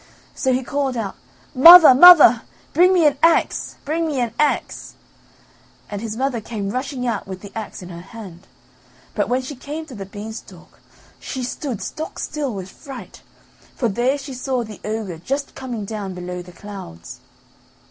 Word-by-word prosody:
So 260 - -1
he 255 +1 0
called 270 -1 -2
out: 205 -4 -4 0.4
"Mother! 330 +2 +10
mother! 285 -6 +8 0.3
bring 355 +4 +5
me 355 -4 +3
an 285 -2 +2
axe, 330 +1 +2
bring 325 +3 -1
me 290 -4 -2
an 235 -2 -2
axe." 300 -1 -1 1.0
And 205 -1 -5
his 225 -1 -5
mother 260 -3 -1
came 205 -3 -5
rushing 255 +1 -4
out 230 -5 -3
with 190 -1 -8
the 200 - -11
axe 220 -4 -7
in 180 - -10
her 170 -1 -9
hand, 190 -3 -12 0.7
but - - -1
when 255 +1 0
she 280 +3 -7
came 295 +5 -7
to 295 - -12
the 195 -4 -8
beanstalk 215 +2 -10 0.4
she 260 -2 -6
stood 250 -2 -5
stock 315 - -6
still 295 -3 -3
with 190 -3 -7
fright 270 -4 -11 0.5
for 240 - 0
there 245 +7 0
she 275 -1 -8
saw 255 -1 -2
the 215 -3 -11
ogre 210 -6 -4
just 275 - -4
coming 245 -6 -6
down 200 -3 -6
below 180 0 -6
the 180 0 -13
clouds. 180 - -10
245 Hz, 170 wpm, -20 LUFS, 205-280 Hz, 1.0 s, Mother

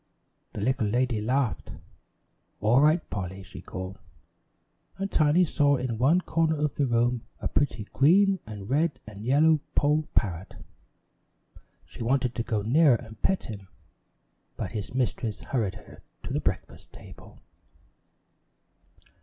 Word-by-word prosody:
The 105 - -5
little 120 -1 +1
lady 120 0 0
laughed. 125 +1 -1 0.9
"All 115 +6 +4
right, 155 +3 +3
Polly," 95 -1 -5
she 95 +1 -11
called, 95 0 -7 1.0
and 195 +1 -3
Tiny 155 +3 +4
saw 145 -2 +2
in 125 -4 -3
one 155 +9 +4
corner 160 -2 +1
of 150 -1 0
the 140 - 0
room 120 0 +1
a - - -2
pretty 125 -6 0
green 190 +7 +4
and 105 -2 -8
red 150 +5 +1
and 105 -1 -10
yellow 150 +6 +4 0.2
poll 150 +1 +2
parrot. 95 -4 -1 1.3
She - - -12
wanted 125 +1 +1
to - - -2
go 110 -3 -2
nearer 140 +4 +5
and 110 -3 -10
pet 190 - +1
him, 100 -3 -8 0.9
but 105 -4 -4
his 105 +2 -5
mistress 120 -4 -1
hurried 110 -8 -1
her - - -14 0.2
to - - -5
the - - +1
breakfast - - -4
table. - - -14
125 Hz, 135 wpm, -27 LUFS, 105-150 Hz, 1.3 s, nearer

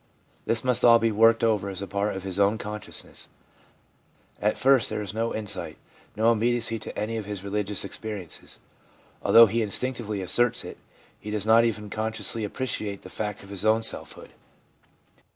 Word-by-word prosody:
This 115 - +1
must 125 -2 +3
all 115 -1 +8
be 115 0 +1
worked 115 +2 +4
over 105 -3 +1
as 95 - -6
part 100 +1 -2
of 95 - -6
his 95 0 -4
own 100 +2 +3
conscious 105 -1 -6
ness. - - -6 1.1
At 105 +1 +1
first 135 -2 +3
there 105 - -3
is 105 - -6
no 115 +1 -1
insight, 105 -2 +1 0.4
no 110 +2 +3
immediacy 115 0 0
to - - -9
any 115 +2 -2
of 105 -2 -6
his 100 -2 -6
religious 100 0 -1
experiences. 100 -3 -5 0.6
Although 115 0 +8
he 115 +2 -1
instinctively 110 -1 0
asserts 120 +6 +1
it, - - -10 0.4
he 105 - -8
does 105 -1 -3
not 115 +1 +5
even 105 -3 -3
consciously 110 0 -1
appreciate 105 -3 -4
the 95 - -10
fact 105 -2 -5
of 100 - -14
his 100 -1 -5
own 110 +1 +3
selfhood. - - -3
110 Hz, 170 wpm, -25 LUFS, 100-115 Hz, 1.1 s, all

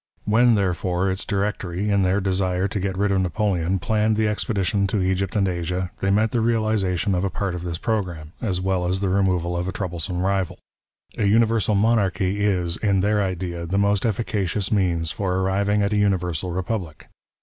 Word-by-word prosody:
When, 115 +2 +4
therefore, 95 -1 0
its 95 - -3
Directory, 100 -1 -2
in 100 -1 +3
their 95 +2 +2
desire 95 -1 0
to 100 +1 -3
get 95 -1 -2
rid 100 0 +1
of 95 -1 +2
Napoleon, 95 -1 0
planned 110 +3 +1
the 110 0 +2
expedition 100 -2 0
to 100 +2 -1
Egypt 95 +1 -1
and 100 -2 +2
Asia, 90 +1 -2
they 95 - 0
meant 105 +2 +2
the 120 - +1
realization 110 -5 +1
of 90 0 0
a 100 - 0
part 95 -1 -3
of 90 - -5
this 85 -2 -4
programme, 90 -8 -3
as 95 -7 -1
well 95 -1 0
as 95 +2 -1
the 100 - 0
removal 90 -3 +1
of 90 +1 -2
a - - -1
troublesome 90 -1 -3
rival. 95 -2 0 0.6
A 105 - +2
universal 110 0 +3
monarchy 100 -2 +1
is, 90 -4 +1
in 100 -3 +1
their 105 +1 +2
idea, 90 -3 -3
the 95 +4 -1
most 100 0 +2
efficacious 105 -3 -1
means 85 -6 +1
for 95 0 -2
arriving 100 +2 +1
at 100 +1 0
a - - +1
universal 90 -4 0
republic. 90 -2 -4
95 Hz, 190 wpm, -23 LUFS, 90-105 Hz, 0.6 s, When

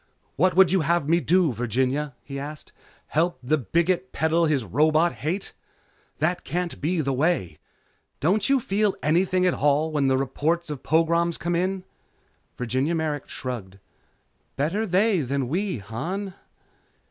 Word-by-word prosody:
"What 180 +2 +2
would 190 -1 +6
you 190 -2 +3
have 165 -1 +1
me 170 +2 +4
do, 170 -1 +2
Virginia?" 130 +4 -1
he 140 -1 -6
asked, 150 +2 -8 0.3
"Help 170 +3 0
the 150 +5 +1
bigot 170 - 0
peddle 160 +1 +2
his 145 -5 +1
robot 155 - +3
hate? 180 +7 -4 0.6
That 175 +4 0
can't 175 0 -3
be 165 +3 0
the 135 -2 -1
way. 130 - 0 0.6
Don't 195 - +1
you 275 -1 +4
feel 205 -2 0
anything 180 +4 +2
at 180 - +3
all 150 +2 +2
when 145 -3 +1
the 130 0 +3
reports 155 +5 -1
of 140 -4 -6
pogroms 170 +2 +2
come 175 0 -2
in?" 185 +2 -1 0.7
Virginia 130 +7 0
Merrick 155 -3 -2
shrugged. 110 -7 -6 0.8
"Better 185 +10 -1
they 195 +2 +3
than 135 -1 -1
we, 185 +4 -1
Han." 175 - -5
160 Hz, 145 wpm, -25 LUFS, 140-180 Hz, 0.8 s, would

